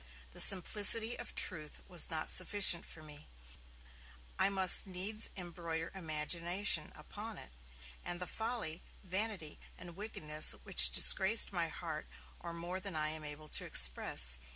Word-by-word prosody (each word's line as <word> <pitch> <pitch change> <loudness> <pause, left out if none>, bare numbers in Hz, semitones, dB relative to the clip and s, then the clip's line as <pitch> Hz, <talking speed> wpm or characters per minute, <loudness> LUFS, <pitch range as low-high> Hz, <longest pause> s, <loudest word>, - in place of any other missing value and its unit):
The - - -1
simplicity 210 +4 +7
of - - -11
truth 155 -4 -6
was 175 -2 0
not 160 -2 -6
sufficient 185 -2 +1
for 155 - -15
me; 150 -1 -15 1.1
I 195 - +1
must 190 -1 +4
needs 195 +4 -3
embroider 170 -2 -8
imagination 170 +1 -3
upon 210 +8 -11
it, - - -11 0.5
and 175 - -6
the 180 - -6
folly, 220 -7 -6 0.2
vanity 190 -4 -6 0.2
and 175 -2 -13
wickedness 155 -7 0
which - - +2
disgraced 200 +2 +3
my 170 -2 -3
heart 160 -1 -8 0.3
are 170 - -10
more 170 +2 -8
than 190 -2 -8
I 155 0 -2
am 155 0 -6
able 150 +1 -9
to - - -2
express. - - +4
175 Hz, 140 wpm, -32 LUFS, 155-195 Hz, 1.1 s, simplicity